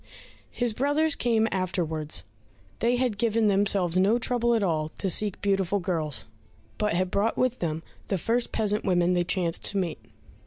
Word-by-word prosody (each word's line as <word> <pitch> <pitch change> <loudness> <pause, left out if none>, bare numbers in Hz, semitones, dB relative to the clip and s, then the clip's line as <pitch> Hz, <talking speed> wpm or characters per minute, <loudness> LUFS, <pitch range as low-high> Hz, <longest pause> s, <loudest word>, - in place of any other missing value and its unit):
His 240 -2 -1
brothers 290 +6 +1
came 225 -4 +1
afterwards; 160 - -1 0.6
they 235 +2 +2
had 245 -5 -1
given 225 -1 +2
themselves 195 -3 +2
no 205 +5 +4
trouble 235 -1 +1
at 220 - +1
all 155 -4 0
to 195 - 0
seek 205 +3 0
beautiful 195 -1 +1
girls, 160 -5 -1 0.5
but 210 -5 +1
had 185 +1 0
brought 210 +3 0
with 255 -1 +1
them 160 -1 -2 0.2
the 195 - 0
first 230 +7 -1
peasant 210 -1 0
women 180 -1 +2
they 175 -1 +2
chanced 175 -2 -1
to 205 - -1
meet. 180 -4 -2
200 Hz, 165 wpm, -26 LUFS, 175-230 Hz, 0.6 s, no